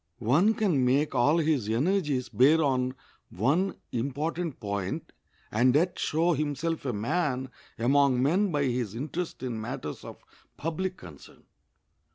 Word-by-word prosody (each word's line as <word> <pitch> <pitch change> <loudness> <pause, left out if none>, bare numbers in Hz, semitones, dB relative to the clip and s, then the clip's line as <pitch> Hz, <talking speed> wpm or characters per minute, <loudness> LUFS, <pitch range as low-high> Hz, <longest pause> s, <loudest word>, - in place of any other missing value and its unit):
One 150 - +3
can 180 -12 +1
make 135 +4 +2
all 145 +7 +3
his 150 -9 +1
energies 145 - +1
bear 135 +8 +4
on 130 -2 0 0.3
one 150 - +1 0.2
important 145 +6 -3
point 100 -3 -4 0.4
and 125 +4 +3
yet 175 +4 +1
show 165 +3 +1
himself 150 +2 -2
a - - +1
man 130 +3 -1 0.3
among 130 +1 +3
men 185 +7 +2
by 145 -2 +1
his 120 -5 -1
interest 155 +5 -4
in 120 -4 -3
matters 95 -9 -6
of - - -11 0.3
public 180 +4 -3
concern. 80 -6 -14
140 Hz, 135 wpm, -28 LUFS, 125-165 Hz, 0.4 s, bear